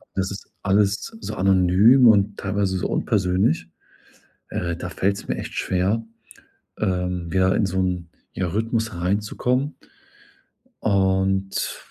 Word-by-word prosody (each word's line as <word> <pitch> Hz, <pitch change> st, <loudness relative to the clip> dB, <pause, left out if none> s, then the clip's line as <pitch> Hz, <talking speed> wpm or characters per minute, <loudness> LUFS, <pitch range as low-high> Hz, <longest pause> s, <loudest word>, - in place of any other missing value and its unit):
das 95 Hz, 0 st, -1 dB
ist 100 Hz, -, -8 dB, 0.2 s
alles 100 Hz, -, +1 dB
so -, -, -5 dB
anonym 95 Hz, +7 st, +5 dB
und 105 Hz, -2 st, +4 dB
teilweise 100 Hz, -1 st, -1 dB
so -, -, -1 dB
unpersönlich. 90 Hz, -4 st, +1 dB, 0.8 s
Äh, 85 Hz, -1 st, -2 dB
da 90 Hz, +1 st, -6 dB
fällt‘s 100 Hz, +2 st, -1 dB
mir -, -, -2 dB
echt -, -, -6 dB
schwer, 95 Hz, +5 st, 0 dB, 0.7 s
ähm, 90 Hz, -3 st, -1 dB
wieder 95 Hz, 0 st, +3 dB
in 105 Hz, -, +2 dB
so 95 Hz, 0 st, -1 dB
‘n, 90 Hz, -2 st, -1 dB, 0.2 s
ja 90 Hz, -, -2 dB
Rhythmus 110 Hz, +3 st, -1 dB
hereinzukommen 105 Hz, -, -1 dB, 1.1 s
und 95 Hz, -1 st, +1 dB
95 Hz, 120 wpm, -23 LUFS, 90-105 Hz, 1.1 s, anonym